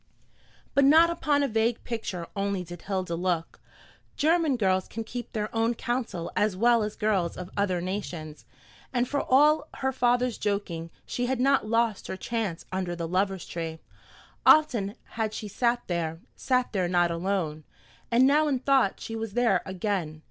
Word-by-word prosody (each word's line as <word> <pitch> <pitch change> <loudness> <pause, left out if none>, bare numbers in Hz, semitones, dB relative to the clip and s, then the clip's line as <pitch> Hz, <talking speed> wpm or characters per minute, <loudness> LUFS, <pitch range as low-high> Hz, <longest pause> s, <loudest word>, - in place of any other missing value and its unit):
But 280 - +4
not 320 +5 +6
upon 300 -4 +1
a - - +2
vague 225 0 0
picture 210 -7 -4
only 200 -2 -1
did 175 0 -10
Hilda 185 -3 -3
look. 170 -1 -2 0.6
German 315 -3 +2
girls 190 -3 +1
can 225 - -5
keep 240 +2 -7
their 215 0 -3
own 225 +1 +1
counsel 235 -9 -3
as 210 -3 +1
well 235 +2 +4
as 210 0 -3
girls 200 -5 0
of 180 0 -7
other 185 -3 0
nations, 175 -5 -5 0.5
and 245 -1 +1
for 285 +2 0
all 300 +4 +4
her 265 0 -1
father's 245 -1 +1
joking 180 -5 -2 0.2
she 245 0 -2
had 260 -1 -1
not 270 -3 +3
"lost 230 -2 +1
her 190 - -4
chance" 215 -5 -3
under 185 -2 -2
the 170 -1 -4
Lovers' 190 +1 0
Tree. 165 -1 -5 0.7
Often 240 -10 +4
had 220 -1 -3
she 215 - -5
sat 240 +3 0
there 165 -2 -2 0.2
sat 255 -2 0
there 185 -3 +1
not 175 -1 +2
alone 165 -3 -2 0.5
and 245 +2 +5
now 300 +3 +4
in 280 -3 +1
thought 265 -5 +2
she 225 - -6
was 225 -2 -4
there 230 -6 +3
again. 185 -5 -2
210 Hz, 170 wpm, -27 LUFS, 180-245 Hz, 0.7 s, not